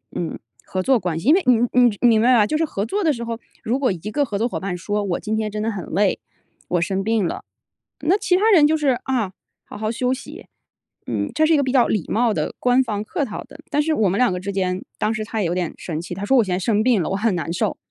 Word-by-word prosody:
嗯， 165 Hz, -2 st, -3 dB, 0.3 s
合 185 Hz, 0 st, -3 dB
作 265 Hz, +1 st, +3 dB
关 175 Hz, -4 st, -2 dB
系， 220 Hz, -, 0 dB
因 -, -, +8 dB
为 385 Hz, -, +3 dB
你 250 Hz, -, +7 dB, 0.2 s
你 245 Hz, -4 st, +4 dB
你 245 Hz, -, +5 dB
明 220 Hz, -2 st, +4 dB
白 250 Hz, +2 st, +5 dB
吧？ 210 Hz, -, +5 dB
就 305 Hz, -, -1 dB
是 325 Hz, -, +1 dB
合 200 Hz, -9 st, -3 dB
作 405 Hz, -, -2 dB
的 320 Hz, -, +3 dB
时 235 Hz, -3 st, -5 dB
候， 230 Hz, -1 st, -4 dB, 0.2 s
如 245 Hz, +5 st, 0 dB
果 265 Hz, -5 st, +2 dB
一 185 Hz, -, -3 dB
个 290 Hz, +6 st, +1 dB
合 210 Hz, -6 st, -3 dB
作 230 Hz, -, +1 dB
伙 -, -, -4 dB
伴 185 Hz, -2 st, -3 dB
说： 205 Hz, +4 st, -2 dB
“我 185 Hz, -3 st, -2 dB
今 220 Hz, -, -2 dB
天 220 Hz, -1 st, -1 dB
真 210 Hz, +1 st, -3 dB
的 225 Hz, -, 0 dB
很 195 Hz, -4 st, -5 dB
累， 195 Hz, +2 st, +1 dB, 0.5 s
我 175 Hz, -, +1 dB
生 190 Hz, +3 st, -1 dB
病 220 Hz, -1 st, +1 dB
了。” -, -, -5 dB, 0.6 s
那 355 Hz, +6 st, +3 dB
其 390 Hz, -3 st, +1 dB
他 440 Hz, +3 st, +3 dB
人 315 Hz, -7 st, +6 dB
就 315 Hz, -, +2 dB
是： 275 Hz, -5 st, +1 dB
“啊， 235 Hz, -8 st, -1 dB, 0.3 s
好 -, -, -10 dB
好 215 Hz, +1 st, -2 dB
休 250 Hz, +2 st, 0 dB
息。” 265 Hz, -, -9 dB, 0.6 s
嗯， 105 Hz, -4 st, -2 dB
这 315 Hz, -, +3 dB
是 325 Hz, -, +4 dB
一 -, -, +5 dB
个 285 Hz, -, +2 dB
比 260 Hz, -, -1 dB
较 255 Hz, -2 st, +4 dB
礼 210 Hz, -7 st, -1 dB
貌 230 Hz, +1 st, +2 dB
的、 -, -, -3 dB
官 250 Hz, +1 st, +3 dB
方 210 Hz, -4 st, -3 dB
客 290 Hz, -, -2 dB
套 215 Hz, -, -6 dB
的。 -, -, -15 dB
但 295 Hz, +1 st, +2 dB
是 315 Hz, +1 st, 0 dB
我 215 Hz, -, +2 dB
们 190 Hz, -, -1 dB
两 250 Hz, -6 st, +4 dB
个 180 Hz, -, -2 dB
之 195 Hz, +2 st, -4 dB
间， 185 Hz, -1 st, -1 dB, 0.2 s
当 215 Hz, -, +1 dB
时 215 Hz, 0 st, -3 dB
他 220 Hz, 0 st, -3 dB
也 185 Hz, -, +1 dB
有 170 Hz, -, -1 dB
点 180 Hz, -3 st, -2 dB
生 160 Hz, -3 st, -5 dB
气， 175 Hz, -, -7 dB
他 195 Hz, +3 st, -6 dB
说 265 Hz, +5 st, +3 dB
我 235 Hz, -, +5 dB
现 185 Hz, -, -2 dB
在 180 Hz, -, 0 dB
生 210 Hz, +2 st, +1 dB
病 235 Hz, -5 st, +3 dB
了， -, -, -2 dB
我 -, -, -1 dB
很 215 Hz, +1 st, +1 dB
难 170 Hz, -1 st, -3 dB
受。 170 Hz, -, -1 dB
220 Hz, 315 characters per minute, -21 LUFS, 195-255 Hz, 0.6 s, 因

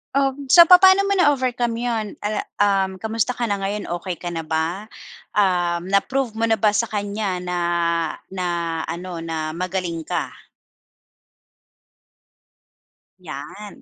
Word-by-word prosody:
Um, 275 Hz, 0 st, 0 dB
so 340 Hz, +6 st, +9 dB
papa'no 375 Hz, +3 st, +7 dB
mo 400 Hz, 0 st, +1 dB
na-overcome 255 Hz, -6 st, +1 dB
yun, 230 Hz, -3 st, -1 dB, 0.2 s
uh, 210 Hz, +1 st, -1 dB, 0.2 s
um, 195 Hz, -2 st, +1 dB
kumusta 225 Hz, +4 st, -2 dB
ka 240 Hz, -, -3 dB
na 205 Hz, -3 st, -1 dB
ngayon, 200 Hz, 0 st, -3 dB
okey 180 Hz, 0 st, -5 dB
ka 175 Hz, 0 st, -6 dB
na 165 Hz, -, -4 dB
ba? 165 Hz, +6 st, -2 dB, 0.5 s
Um, 180 Hz, -2 st, +1 dB
na-prove 245 Hz, +5 st, +1 dB
mo 225 Hz, +1 st, -1 dB
na 225 Hz, -, +3 dB
ba 210 Hz, 0 st, +2 dB
sa 230 Hz, +2 st, 0 dB
kanya 205 Hz, -3 st, -3 dB
na 180 Hz, 0 st, -3 dB, 0.7 s
na 185 Hz, -1 st, -3 dB, 0.4 s
ano, 170 Hz, +1 st, -5 dB
na 160 Hz, -1 st, -4 dB
magaling 175 Hz, -1 st, -4 dB
ka? -, -, -2 dB, 2.9 s
Yan. 185 Hz, +5 st, -9 dB
200 Hz, 130 wpm, -21 LUFS, 180-235 Hz, 2.9 s, so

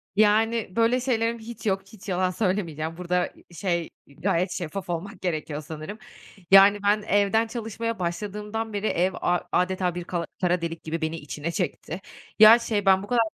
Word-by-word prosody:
Yani, 215 Hz, -1 st, +2 dB
böyle 230 Hz, +2 st, +3 dB
şeylerim 235 Hz, -2 st, 0 dB
hiç 225 Hz, 0 st, -9 dB
yok, 195 Hz, -2 st, +1 dB
hiç 215 Hz, 0 st, -13 dB
yalan 185 Hz, 0 st, +1 dB
söylemeyeceğim. 170 Hz, -5 st, -2 dB
Burada, 180 Hz, 0 st, -1 dB, 0.2 s
şey, 170 Hz, -1 st, -2 dB, 0.2 s
eee, 140 Hz, -, -19 dB
gayet 180 Hz, -1 st, +1 dB
şeffaf 175 Hz, +2 st, -5 dB
olmak 180 Hz, +3 st, -4 dB
gerekiyor 155 Hz, -4 st, -3 dB
sanırım. 155 Hz, +6 st, -7 dB, 0.5 s
Yani, 195 Hz, +1 st, +8 dB
ben 205 Hz, +1 st, +3 dB
evden 205 Hz, +2 st, +2 dB
çalışmaya 230 Hz, -1 st, -4 dB
başladığımdan 210 Hz, +5 st, -3 dB
beri 205 Hz, +1 st, -1 dB
ev 185 Hz, 0 st, +1 dB
a 175 Hz, 0 st, +2 dB
âdeta 180 Hz, -1 st, +1 dB
bir 175 Hz, -, -4 dB
kala 175 Hz, -1 st, -3 dB, 0.2 s
kara 180 Hz, -1 st, +2 dB
delik 165 Hz, 0 st, -4 dB
gibi 165 Hz, +1 st, -4 dB
beni 160 Hz, +1 st, -1 dB
içine 150 Hz, +1 st, -5 dB
çekti. 170 Hz, +2 st, -3 dB, 0.4 s
Ya, 220 Hz, +2 st, +10 dB
şey 215 Hz, -4 st, -1 dB
ben 190 Hz, 0 st, +5 dB
bu -, -, -8 dB
kadar, 235 Hz, +1 st, +3 dB
190 Hz, 170 wpm, -25 LUFS, 170-215 Hz, 0.5 s, Ya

